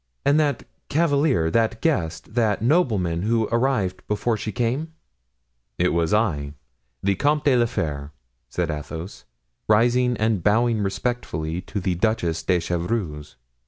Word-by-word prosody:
"And 145 +2 +4
that 145 -5 +1 0.3
cavalier, 145 - +2
that 115 +1 +1
guest, 90 - -1
that 110 -3 +1
nobleman 110 - +2
who 110 +2 +1
arrived 115 -6 +1
before 105 +3 0
she 110 0 -4
came?" 125 - -2 0.8
"It - - +2
was 85 -1 0
I, 75 -10 0 0.5
the 100 +1 +3
Comte 150 +6 +1
de 140 -3 +4
la 120 -1 +3
Fere," 75 -10 -3 0.4
said 85 +3 -1
Athos, 80 +5 -7 0.4
rising 120 +3 +3
and 110 -3 +1
bowing 115 +1 +3
respectfully 95 -6 -2
to 105 - -3
the 90 -1 0
Duchess 85 -4 0
de 90 +2 +2
Chevreuse. 85 - -3
110 Hz, 135 wpm, -23 LUFS, 85-120 Hz, 0.8 s, And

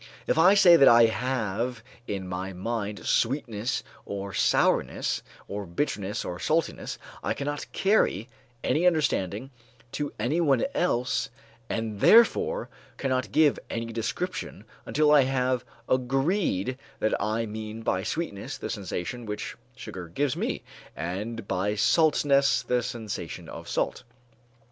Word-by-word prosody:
If - - +1
I 180 +5 +6
say 175 -4 +8
that 140 - +7
I 115 0 +8
have 120 -1 -1 0.2
in 95 -2 -3
my 95 +1 -4
mind 105 +2 -4
sweetness 120 -1 0 0.2
or 100 -1 -5
sourness, - - +2 0.3
or 100 -1 -5
bitterness 100 - -2
or 90 0 -5
saltness, 160 +1 -1 0.3
I - - 0
cannot 145 +1 -4
carry 190 - +2 0.4
any 170 +4 +2
understanding 135 - 0 0.4
to 145 -1 -3
anyone 135 +2 +2
else 125 +1 0 0.4
and 110 -2 -3
therefore 450 - +5 0.3
cannot 130 -2 -1
give 155 -2 +4
any 115 0 -4
description 115 - -4 0.2
until 150 0 +3
I 150 -1 +7
have 130 -1 0 0.2
agreed 130 - 0 0.2
that 110 - 0
I 110 +2 0
mean 110 +1 -6
by 95 - 0
sweetness 105 - -4
the - - -5
sensation 105 +3 -4
which 105 0 -4 0.2
sugar 90 -8 -8
gives 135 - -1
me, - - -2 0.3
and 100 +6 -4
by 100 +3 0
saltness 140 +3 +3
the 125 0 +1
sensation 110 - -5
of - - -9
salt. - - -1
120 Hz, 125 wpm, -27 LUFS, 105-145 Hz, 0.4 s, say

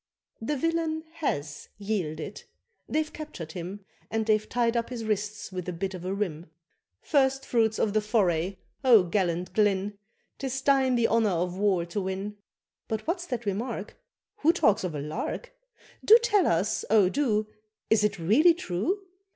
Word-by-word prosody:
The 285 +6 -1
villian 325 +1 0
has 145 - -3
yielded 195 -3 -4 0.4
they've 310 0 -1
captured 175 - -7
him, 185 +4 -7 0.2
And 225 0 -1
they've 215 -1 +1
tied 235 -1 +1
up 235 0 0
his 235 -3 -5
wrists 210 -1 -2
with 185 -1 -4
a - - -3
bit 190 +3 -3
of 180 -2 -7
a 185 - -3
reim 180 -5 -3 0.5
First 270 -2 +2
fruits 225 -2 +2
of 205 - +1
the 215 - +3
foray! 190 -4 +1 0.3
oh, 235 -7 +7
gallant 180 -1 -1
Glynn, 205 -1 +1 0.4
'Tis 265 -1 -2
thine 265 -2 +4
the 235 -1 +3
honour 225 -2 +3
of 180 0 -1
war 190 -3 +1
to 175 +4 -3
win. 195 +2 -4 0.5
But 220 -1 -3
what's 350 +1 -2
that 240 -3 -4
remark? 210 +1 -3 0.4
Who 315 - +4
talks 215 - +2
of 175 -4 -3
a 145 - -3
lark? 155 - -4 0.5
Do 445 - +9
tell 410 -7 +3
us, 195 +6 +1
oh 210 -4 +5
do, 215 -2 +1 0.5
Is 220 -1 +5
it 205 -1 +1
really 250 - +5
true? 355 - -2
210 Hz, 165 wpm, -27 LUFS, 185-255 Hz, 0.5 s, Do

